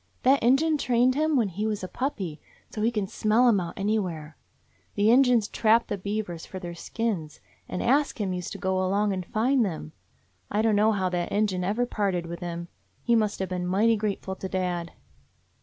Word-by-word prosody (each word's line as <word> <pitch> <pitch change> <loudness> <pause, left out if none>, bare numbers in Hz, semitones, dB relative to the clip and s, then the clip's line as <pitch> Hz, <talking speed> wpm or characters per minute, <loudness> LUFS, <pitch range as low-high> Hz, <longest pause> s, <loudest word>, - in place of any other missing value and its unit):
That 270 +2 +4
Injun 295 +6 +3
trained 250 0 +3
him 310 +2 +1
when 230 -6 +2
he 205 +5 -3
was 210 -3 -3
a - - -3
puppy, 190 - -4 0.3
so 215 - -5
he 225 - +3
can 215 -4 -1
smell 220 +5 +2
'em 220 -5 +4
out 170 -2 -5
anywhere. 185 -7 -2 0.6
The 210 +1 +4
Injuns 245 -4 +4
trap 225 +1 +3
the 205 - -2
beavers 200 -4 -4
for 190 - -8
their 175 -2 -6
skins, 170 -4 -3 0.3
and 180 - -3
Ask 275 +1 +2
Him 195 -3 -1
used 180 -1 -5
to - - -6
go 190 -1 0
along 200 +2 +1
and 185 -1 -3
find 240 +7 +1
them. 165 -5 -4 0.6
I 210 +2 0
dunno 215 -1 +4
how 190 -2 0
that 175 -1 -2
Injun 200 -3 0
ever 215 +6 0
parted 195 -7 -1
with 170 0 -6
him. 170 -1 -5 0.4
He 235 - +2
must 215 -3 +2
have 190 -1 -3
been 180 -1 -3
mighty 215 +5 +3
grateful 205 -2 -3
to 190 - -5
dad. 180 -3 -2
205 Hz, 195 wpm, -26 LUFS, 180-230 Hz, 0.6 s, That